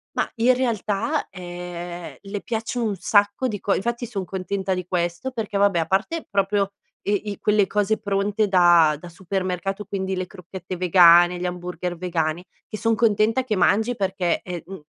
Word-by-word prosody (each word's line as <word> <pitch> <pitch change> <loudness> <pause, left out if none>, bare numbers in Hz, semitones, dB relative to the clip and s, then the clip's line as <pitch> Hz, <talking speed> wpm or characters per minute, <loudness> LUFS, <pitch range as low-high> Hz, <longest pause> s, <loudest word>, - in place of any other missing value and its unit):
Ma - - 0
in 240 +2 +4
realtà, 240 +3 -1
ehm, 175 -1 -7
le 200 0 -5
piace 225 +1 -3
un 220 -4 0
sacco 205 +6 +2
di 210 -4 -4
co 200 - +1
infatti 235 +4 -2
son 205 -5 -4
contenta 190 +1 -2
di 180 -1 -3
questo 175 +7 -2
perché, 220 -4 -3
vabbè, 200 -3 +3
a 165 - 0
parte 220 - -1
proprio 200 0 +1 0.3
i 205 +1 -1
i 200 - -8
quelle 210 -2 +3
cose 210 +1 0
pronte 205 +1 0
da 175 -5 +5
da 175 - -10
supermercato, 190 +2 -3
quindi 190 -1 -3
le 185 0 -2
crocchette 185 -1 -8
vegane, 175 0 +6
gli 180 - -3
hamburger 180 0 -4
vegani 165 -1 -1 0.2
che 215 - -6
son 225 +1 +1
contenta 225 +2 +2
che 235 -4 -1
mangi 220 +5 +2
perché 190 -4 -1
è, 175 -2 -6
mhmm, 190 -3 -9
195 Hz, 175 wpm, -23 LUFS, 180-210 Hz, 0.3 s, vegane